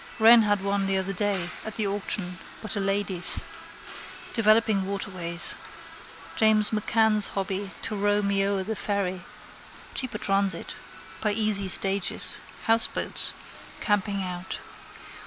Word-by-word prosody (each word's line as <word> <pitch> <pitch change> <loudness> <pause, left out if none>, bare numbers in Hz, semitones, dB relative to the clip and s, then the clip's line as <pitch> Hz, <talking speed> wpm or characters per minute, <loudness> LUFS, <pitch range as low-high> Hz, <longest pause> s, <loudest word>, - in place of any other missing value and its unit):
Wren 230 +1 +8
had 205 -2 +1
one 200 0 0
the 195 0 +1
other 190 +1 -2
day 195 -2 0 0.2
at 220 - -7
the 215 - 0
auction 195 -3 -2 0.2
but 215 - -4
a - - -1
lady's. 195 -2 0 0.9
Developing 215 -3 +3
waterways. 185 -3 -3 0.8
James 220 -1 +4
M'Cann's 215 0 +2
hobby 195 0 -2
to 225 - -3
row 205 +1 +1
me 200 0 +2
o'er 195 -1 0
the 220 +3 -4
ferry. 195 -3 -2 0.7
Cheaper 255 -5 -2
transit. 195 -1 +2 0.5
By 210 -1 +1
easy 210 -2 +3
stages. 195 +3 +1 0.3
Houseboats. 225 0 +2 0.5
Camping 205 -2 0
out. 180 0 -5
200 Hz, 120 wpm, -26 LUFS, 195-215 Hz, 0.9 s, Wren